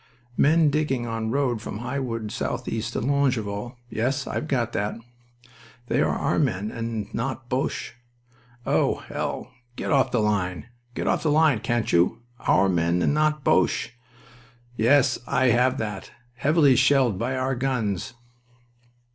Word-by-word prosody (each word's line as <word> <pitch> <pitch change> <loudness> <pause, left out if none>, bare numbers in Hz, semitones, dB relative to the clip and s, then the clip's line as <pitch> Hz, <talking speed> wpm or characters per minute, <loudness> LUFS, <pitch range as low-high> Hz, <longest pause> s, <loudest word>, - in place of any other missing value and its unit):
'Men 155 +2 +4
digging 140 -5 0
on 115 -1 -3
road 125 -3 0
from 105 - -6
High 125 +5 -3
Wood 115 -5 -4
southeast 115 +2 -3
to - - -2
Longueval.' 120 -4 -1
Yes, 130 +4 -1
I've 155 - -3
got 120 -5 -1
that. 105 +1 -2 0.9
'They 125 +3 +1
are - - +1
our - - 0
men 105 -7 0
and 115 -3 -4
not 120 +1 -4
Boches.' 135 +4 -2 0.7
Oh, - - +2
hell!... - - -5 0.2
Get - - -3
off 140 -3 +3
the 120 - 0
line. 100 -3 0 0.3
Get - - -3
off - - +1
the 160 - 0
line, 150 -5 +4
can't 120 +1 -1
you?... 90 +7 +2 0.2
'Our 95 +1 +4
men 85 -1 +1
and - - +2
not 150 -1 +1
Boches.' - - +2 0.8
Yes, 130 +3 +3
I 130 -2 +2
have 125 +3 +3
that. 105 -5 -5 0.2
'Heavily 140 +1 +4
shelled 130 -6 +3
by 125 +3 -1
our 130 +1 0
guns.'" 120 -4 -2
120 Hz, 145 wpm, -25 LUFS, 110-135 Hz, 0.9 s, Men